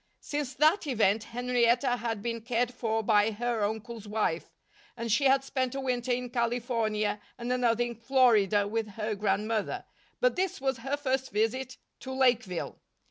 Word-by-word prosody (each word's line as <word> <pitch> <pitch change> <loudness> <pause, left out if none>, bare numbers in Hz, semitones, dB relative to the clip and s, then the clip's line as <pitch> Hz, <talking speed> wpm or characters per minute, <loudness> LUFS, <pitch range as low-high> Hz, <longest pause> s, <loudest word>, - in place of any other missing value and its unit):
Since 290 -3 -3
that 310 +5 +3
event 220 -4 +2
Henrietta 245 +1 +1
had 225 -3 -3
been 230 -1 -3
cared 240 +1 0
for 225 -2 -1
by 210 0 +4
her 230 0 -1
uncle's 220 +1 -4
wife; 205 -6 -1 0.5
and 230 -1 -3
she 275 +6 +3
had 270 0 +4
spent 260 -2 -2
a - - -2
winter 250 -2 -1
in 245 0 -1
California 230 -3 0 0.2
and 240 +1 -2
another 240 -2 +2
in 240 0 -3
Florida 225 -4 +3
with 225 +1 -2
her 215 0 -1
grandmother, 210 +2 -1 0.3
but - - +3
this 370 0 -1
was 265 -1 0
her 270 +5 -2
first 265 -2 -1
visit 250 +5 -1 0.2
to 265 - -6
Lakeville. 245 -9 0
235 Hz, 160 wpm, -29 LUFS, 220-255 Hz, 0.5 s, by